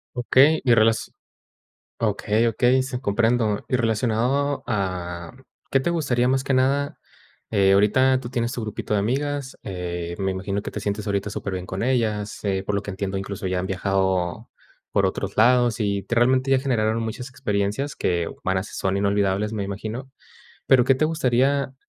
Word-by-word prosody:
Okey, 135 +5 +4
y 120 - +5
relas 110 0 +2 0.9
okey, 110 +1 +1
okey, 125 +3 +3
sí, 130 -1 -4
comprendo, 115 -1 +1
y 125 - +2
relacionado 120 +5 0
a, 90 -5 -3 0.4
¿qué 135 - +4
te 135 +6 -1
gustaría 135 -8 +1
más 130 +1 +2
que 135 - -1
nada? 135 +2 +1 0.5
Eh, 100 -2 +4
ahorita 130 +6 +4
tú 120 - -7
tienes 120 -1 -1
tu 120 - -4
grupito 105 0 -5
de 105 - +3
amigas, 135 +5 -2
eh, 85 -2 -5
me 95 -1 0
imagino 100 +2 -3
que - - -7
te - - -4
sientes 105 +1 -3
ahorita 100 0 -1
súper 100 -1 -4
bien 90 -1 -4
con 95 +4 -3
ellas, 110 -5 -1
eh, 95 -2 -1
por 105 - -2
lo 100 - 0
que - - -6
entiendo 95 0 -3
incluso 100 0 -4
ya 90 0 0
han 95 - -3
viajado, 95 -2 -1 0.4
por - - +2
otros - - -3
lados, 120 0 +4
y 100 -3 0
te 120 - -3
realmente 130 +2 +3
ya 135 - +5
generaron 115 -4 0
muchas 125 +3 -5
experiencias 115 +2 -2
que, 85 -2 -1
van 95 0 0
a - - 0
s - - -11
son 95 0 -1
inolvidables, 100 +1 +1
me 105 -2 -2
imagino. 110 +7 -5 0.6
Pero, 130 -2 +5
¿qué 135 - +4
te 130 - +1
gustaría? 140 -3 +1
110 Hz, 180 wpm, -23 LUFS, 100-130 Hz, 0.9 s, y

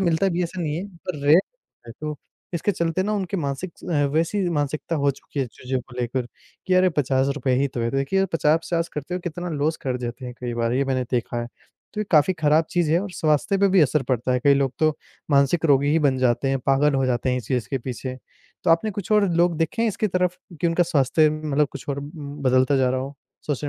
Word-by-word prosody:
मिलता 175 +1 +2
भी 175 -2 -2
है, 180 - +2
ऐसा 180 +2 -6
नहीं 150 -1 -2
है, 180 +4 -4
पर 170 -2 -6
रेयर 155 +5 +7 0.5
है। 115 - -8
तो 150 -1 -4 0.4
इसके 170 +5 0
चलते 170 0 0
ना, 210 +2 -1
उनके 195 -1 -2
मानसिक 145 +2 -3
स - - -14
अ, 150 -4 +1
वैसी 175 +4 +1
मानसिकता 155 +1 -2
हो 140 -1 +2
चुकी 140 +1 -6
है 135 - 0
चीज़ों 125 +2 -4
को 125 0 -15
लेकर 125 +1 -2 0.4
कि, 185 - +2
"अरे! 185 0 +5
₹50 135 0 +1
ही 140 - +3
तो 125 -2 -5
है।" 115 0 0
तो 135 - -2
देखिए, 140 +8 +1
आप 195 - -1
50-50 165 +2 +1
करते 150 +4 -4
हुए 180 - -3
कितना 175 +1 -4
लॉस 155 +1 0
कर 130 -2 -1
जाते 125 +2 -6
हैं 125 -1 -6
कई 120 -1 -3
बार, 115 0 0
ये 135 +2 +1
मैंने 130 -1 0
देखा 120 -1 -1
है। 120 - -4 0.5
तो 210 - -2
ये - - -1
काफ़ी 155 +3 +5
खराब 155 +1 +4
चीज़ 175 -3 +1
है 170 - +3
और 200 +1 -5
स्वास्थ्य 155 +5 +1
पे 200 0 +4
भी 190 -1 +4
असर 150 -1 +3
पड़ता 125 -1 -1
है, 125 - +1
कई 140 -1 +6
लोग 135 -2 +1
तो 155 -1 +2 0.3
मानसिक 140 +4 +3
रोगी 140 -2 +4
ही 160 - +3
बन 130 -1 0
जाते 130 +1 +1
हैं, 135 0 +1
पागल 140 +2 +3
हो 135 0 +2
जाते 125 0 0
हैं 125 - +1
इस 125 - -8
चीज़ 125 -4 -1
के 135 - 0
पीछे। 130 +1 -5 0.5
तो 175 - +3
आपने 165 +6 +3
कुछ 205 +1 -4
और 210 -2 +4
लोग 170 -1 +3
देखे 165 +8 0
हैं 230 - +3
इसकी 215 +1 -1
तरफ 180 -1 0 0.2
कि 170 - +2
उनका 165 +1 +3
स्वास्थ्य 155 -1 +3
अम, 155 0 -1
मतलब 150 +1 +3
कुछ 140 - -9
और 140 -1 -2
उम, 145 0 -8
बदलता 130 +1 +3
जा 130 -1 +2
रहा 130 0 0
हो, 135 +2 -6 0.3
सोशल 145 0 -2
150 Hz, 255 wpm, -23 LUFS, 130-170 Hz, 0.5 s, रेयर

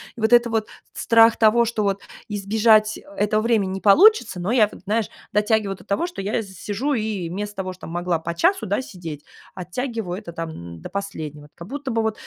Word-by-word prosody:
и 230 - -9
вот 220 +2 +2
это 240 0 +6
вот 220 -1 -1 0.3
с - - -6
страх 230 0 +6
того, 235 +2 +4
что 220 -2 -1
вот 200 -1 0 0.3
избежать, 215 +1 +3
э, - - -12 0.2
этого 215 +1 +1
времени 220 -5 +1
не 190 0 -4
получится, 245 - +5
но 190 +7 -1
я 215 -5 +4
вот, - - -13
знаешь, 215 +1 0 0.2
дотягиваю 210 -1 +1
до - - -16
того, 200 +13 -1
что 350 - -7
я 200 +4 -1
из 195 -4 -7
сижу 240 +11 -2
и 215 -6 -2
вместо 205 +3 -5
того, 185 -1 -3
что 185 - -12
могла 175 0 -1
по 170 +1 -4
часу, 345 - +2
да, 205 +5 0
сидеть, 165 - -8 0.3
оттягиваю 195 +1 -4
это 200 -5 -8
там, 165 -1 -5
м, 85 - -9
до - - -8
последнего. 155 -7 -6
Как 170 - -10
будто 275 0 -5
бы 220 -1 0
210 Hz, 215 wpm, -22 LUFS, 185-225 Hz, 0.3 s, это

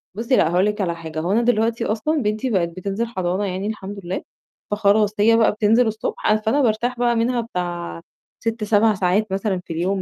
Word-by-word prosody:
بُصّي، 230 +4 +1
لأ 160 - +3
هاقول 180 +3 +3
لِك 210 0 -1
على 170 -3 -1
حاجة، 160 -1 -6
هو 175 +4 -1
أنا 230 +3 +3
دلوقتي 230 -1 +1
أصلًا 285 +8 0
بنتي 215 +4 -1
بقِت 180 -6 +1
بتنزل 195 +6 -3
حضانة 190 -2 -2
يعني 190 +2 -3
الحمد 205 -2 -6
لله، 180 - -3 0.5
فخلاص 210 0 +3
هي 225 +2 +5
بقى 225 - +4
بتنزل 220 +3 +3
الصبح، 220 0 -4
أ 215 - +5
فأنا 220 +7 +1
بارتاح 240 +1 0
بقى 240 -1 +2
منها 240 +1 +1
بتاع 175 -5 -5 0.4
6، 225 -1 -2
7 215 +1 +3
ساعات 190 +2 0
مثلًا 195 -1 -1
في 165 - -6
اليوم 185 +4 -1
210 Hz, 205 wpm, -21 LUFS, 185-230 Hz, 0.5 s, هي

